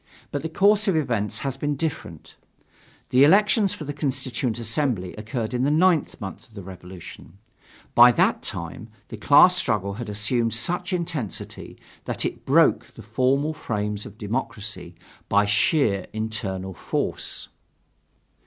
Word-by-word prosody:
But 145 - -2
the 160 - -4
course 205 +5 +3
of 190 - +2
events 115 -9 0
has 135 -1 -2
been 145 +1 -1
different. 130 - -5 0.8
The 130 +2 +6
elections 205 +5 +4
for - - -8
the 145 0 -5
Constituent 130 -5 -2
Assembly 115 -5 -1
occurred 110 +2 -4
in 125 - 0
the 135 - +2
ninth 165 +1 +2
month 95 -4 -8
of 110 - -22
the 100 - -8
Revolution. 90 -1 -11 0.6
By 120 +1 +8
that - - +2
time 100 +8 -6 0.2
the 110 - -7
class 145 - +6
struggle 105 - 0
had 115 - -6
assumed 115 +2 0
such 175 - -2
intensity 165 - -4 0.3
that - - -2
it - - -5
broke - - +4
the - - -14
formal 130 +7 +1
frames 105 -7 -3
of 105 - -14
democracy 105 -5 -4 0.3
by 100 +1 +4
sheer 110 - +2
internal 105 -4 -4
force. - - -3
120 Hz, 145 wpm, -24 LUFS, 105-145 Hz, 0.8 s, By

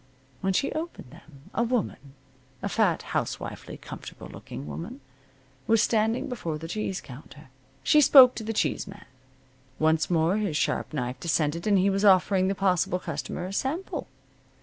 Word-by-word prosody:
When 190 +7 0
she 275 - +1
opened 315 - -6
them 140 -1 -17
a 230 - 0
woman 230 - -2 0.5
a - - -1
fat, - - +1
housewifely, - - -4
comfortable - - -10
looking 70 - -9
woman 75 - -7 0.7
was 225 -1 +4
standing 225 +4 +1
before 210 - -4
the 165 +2 -7
cheese 195 0 -3
counter. 140 +2 -13 0.3
She 300 - +5
spoke 260 -2 +9
to 225 - -6
the 220 - -3
cheese 215 - -1
man. 195 0 -11 0.7
Once 160 0 +2
more 170 +3 +2
his 200 -8 -1
sharp - - -1
knife 125 -3 -3
descended 165 +2 0
and 205 -2 +4
he 195 +1 +3
was 195 +1 0
offering 190 -1 +4
the 195 - 0
possible 180 -2 +1
customer 180 0 -5
a 190 - -6
sample. 300 - -3
190 Hz, 160 wpm, -27 LUFS, 155-220 Hz, 0.7 s, spoke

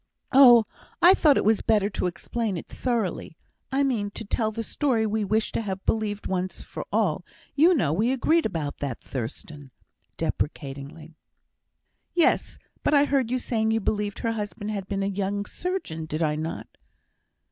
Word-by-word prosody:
"Oh! 245 -4 +8 0.4
I 355 +2 +8
thought 300 -7 +4
it - - +1
was 220 0 +3
better 210 -3 +2
to 185 - -1
explain 210 +3 -3
it - - -7
thoroughly 225 -9 -2 0.3
I 275 +1 +2
mean, 230 -7 0
to 225 - -6
tell 215 +2 0
the 225 +1 -4
story 240 -2 0
we 215 0 0
wished 215 +2 0
to - - 0
have 195 -3 -5
believed 210 -2 -1
once 185 0 -2
for - - -7
all - - +1 0.3
you 335 +5 +5
know 160 - +1
we 220 +9 +1
agreed 315 +5 +2
about 160 -8 -4
that, 135 -5 -4
Thurstan?" 135 +3 -6 0.5
deprecatingly. 145 +2 -4 1.0
"Yes; 345 - +2 0.3
but 300 - +3
I 285 0 +5
heard 270 -5 +1
you 255 - +1
saying 225 -3 -1
you 225 0 +2
believed 205 -1 -2
her 230 - -1
husband 210 -1 -4
had 200 -3 -4
been 195 -1 -2
a - - 0
young 200 +1 -2
surgeon, 270 - -4
did 155 +2 -2
I 150 -1 +1
not?" 160 +2 -4
210 Hz, 170 wpm, -25 LUFS, 180-240 Hz, 1.0 s, Oh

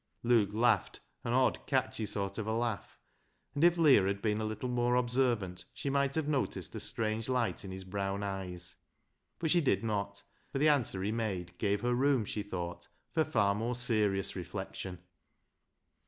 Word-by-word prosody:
Luke 115 -4 +4
laughed 110 -1 +2 0.2
an 115 - -1
odd 130 0 +2
catchy 130 -5 0
sort 100 +1 -2
of 110 - -3
a 110 - 0
laugh, 115 -5 -2 0.6
and 145 - 0
if 175 0 +6
Leah 140 - +6
had 100 0 -1
been 105 0 0
a - - -1
little 110 +3 -3
more 120 0 +1
observant 120 -7 +1
she 140 - -2
might 140 0 +1
have 160 -2 0
noticed 140 -4 -1
a 110 - -4
strange 110 +1 -2
light 125 -4 0
in 95 - -7
his 95 0 -5
brown 100 +1 -2
eyes, 90 -3 -4 0.6
but 160 -2 0
she 175 - +5
did 135 - +2
not, 100 -2 -2 0.3
for - - -2
the 150 +3 +5
answer 120 -10 +1
he 105 - 0
made 95 -6 -3
gave 100 -1 +1
her 120 0 +1
room 130 -2 +3
she 105 - -3
thought 90 -4 -5 0.3
for 160 - +3
far 105 -10 +2
more 115 +4 -1
serious 105 -5 +1
reflection. 95 0 -5
110 Hz, 180 wpm, -32 LUFS, 100-125 Hz, 0.6 s, if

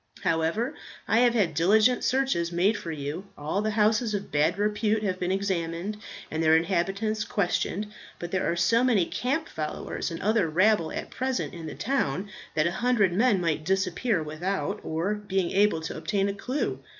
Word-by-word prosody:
However, 170 - 0 0.3
I 225 - +3
have 240 -1 +4
had 190 -8 +2
diligent 215 - +4
search 270 +1 +2 0.2
made 185 +6 +2
for 170 - -5
you. 155 +5 -5
All 155 +7 -1
the 215 - 0
houses 215 +1 +2
of 200 0 -5
bad 150 +5 +2
repute 210 +1 +1
have 185 -2 -1
been 180 0 -1
examined, 190 0 -2 0.4
and 160 - -1
their 160 0 +5
inhabitants 195 +5 0
questioned. 200 +1 -1 0.3
But 175 0 -6
there 185 -2 0
are - - -1
so 175 +8 +3
many 225 -9 +3
camp 280 - -2
followers 155 -1 -4
and 165 - -6
other 210 -4 +2
rabble 185 0 +3
at - - -5
present 260 0 -2
in 165 -2 -7
the 155 - -6
town 205 - -1 0.2
that 155 0 +2
a 170 - +1
hundred 215 -3 +2
men 215 0 +3
might 160 -3 -1
disappear 190 +2 0
without 185 +6 -3
our 165 +6 -1
being 195 -4 -1
able 200 -4 +3
to 160 - -5
obtain 200 -1 0
a - - -2
clue. 235 - -2
195 Hz, 180 wpm, -27 LUFS, 170-215 Hz, 0.4 s, their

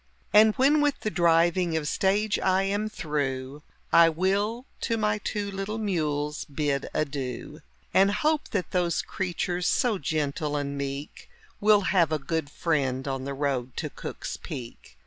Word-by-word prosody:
And 215 +1 +7
when 290 +3 +4
with 290 -1 +1
the 215 - -2
driving 170 0 +3
of 150 -2 -2
stage 205 +5 +1
I 190 0 +2
am 205 +2 -1
through 145 -6 -3 0.3
I 165 0 +8
will 200 +8 0
to 230 -2 -1
my 210 -1 +1
two 205 -1 -3
little 195 +3 -4
mules 150 -8 -1
bid 145 -2 -2
adieu. 135 -5 -3 0.3
And 195 +1 +5
hope 300 +9 +1
that 200 -5 -2
those 175 -2 +1
creatures, 180 -1 -2
so 235 -7 +2
gentle 150 0 -1
and 140 -1 -2
meek, 140 +1 -5 0.3
Will 210 0 +5
have 180 -4 +2
a 155 - +2
good 160 0 -3
friend 140 -5 -1
on 135 -1 -3
the 140 0 -4
road 135 -3 -2
to - - -3
Cook's - - -6
Peak. 115 - -9
170 Hz, 155 wpm, -27 LUFS, 145-205 Hz, 0.3 s, I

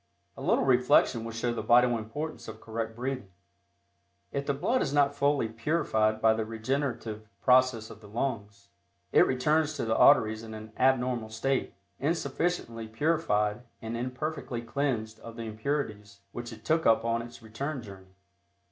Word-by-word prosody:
A - - -10
little - - +2
reflection 125 -2 +4
will 115 - -5
show 115 +1 -1
the 120 - -3
vital 120 0 +5
importance 130 +9 -5
of 110 0 -8
correct 115 0 -4
breathing. 125 -3 -4 1.0
If 140 0 -3
the 140 - +2
blood 250 - +1
is 135 - -1
not 145 -1 +3
fully 140 -3 +1
purified 110 -3 0
by 110 0 +5
the 110 0 -1
regenerative 115 -1 -3 0.2
process 130 -3 +4
of 110 - -12
the 105 - -13
lungs, 105 -3 -4 0.4
it - - +6
returns 150 +4 +1
to 140 - -2
the 110 0 +1
arteries 110 -6 +5
in 110 -1 -8
an 110 0 -10
abnormal 125 -3 +1
state, 130 +5 -1 0.2
insufficiently 140 -5 -1
purified 110 -5 +1 0.2
and 115 +1 -5
imperfectly 125 0 -4
cleansed 115 -3 -2
of 115 -1 -10
the 115 - -6
impurities 110 -3 -4
which 120 +1 -6
it 110 0 -12
took 160 +1 +2
up 115 0 +4
on 115 0 +1
its 120 0 -11
return 130 +5 -4
journey. 95 -2 -13
115 Hz, 160 wpm, -29 LUFS, 110-135 Hz, 1.0 s, it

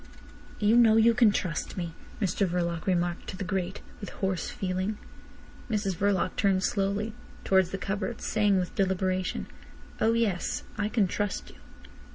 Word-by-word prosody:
"You 210 +2 +3
know 225 -2 +7
you 230 +1 +6
can 230 -2 +5
trust 180 -4 -2
me," 170 -2 -3 0.3
Mr 195 0 +1
Verloc 170 -1 -2
remarked 175 -1 0
to 185 - -6
the 195 - -3
grate, 190 0 -2 0.2
with 200 - -6
hoarse 190 -3 -2
feeling. 190 +2 -2 0.7
Mrs 205 -4 0
Verloc 190 0 +1
turned 195 -1 +2
slowly 200 +2 0 0.3
towards 190 -2 +3
the 195 - -3
cupboard, 195 +4 -3
saying 210 -2 +2
with 180 -1 -1
deliberation: 185 -2 0 0.5
"Oh 225 +1 +3
yes. 220 -6 0
I 205 0 -1
can 215 -2 +3
trust 205 +2 -3
you." - - -18
195 Hz, 155 wpm, -28 LUFS, 185-210 Hz, 0.7 s, know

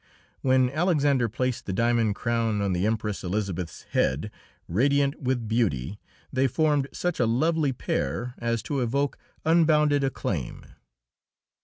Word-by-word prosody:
When 130 -1 +3
Alexander 145 -6 +2
placed 125 +2 -2
the 95 - -2
diamond 115 0 +2
crown 115 -2 0
on 100 -2 0
the 90 +3 +1
Empress 105 -2 -2
Elisabeth's 90 -3 -3
head, 75 +11 0 0.4
radiant 140 - +1
with 125 -3 -1
beauty, 105 - 0 0.3
they 130 +1 +3
formed 145 +1 +1
such 175 -2 -2
a 120 - +3
lovely 150 +5 +2
pair 120 - -2
as 115 -2 -1
to 140 - -2
evoke 140 +4 -1 0.3
unbounded 150 -3 +4
acclaim. 95 - -3
120 Hz, 130 wpm, -26 LUFS, 105-140 Hz, 0.4 s, unbounded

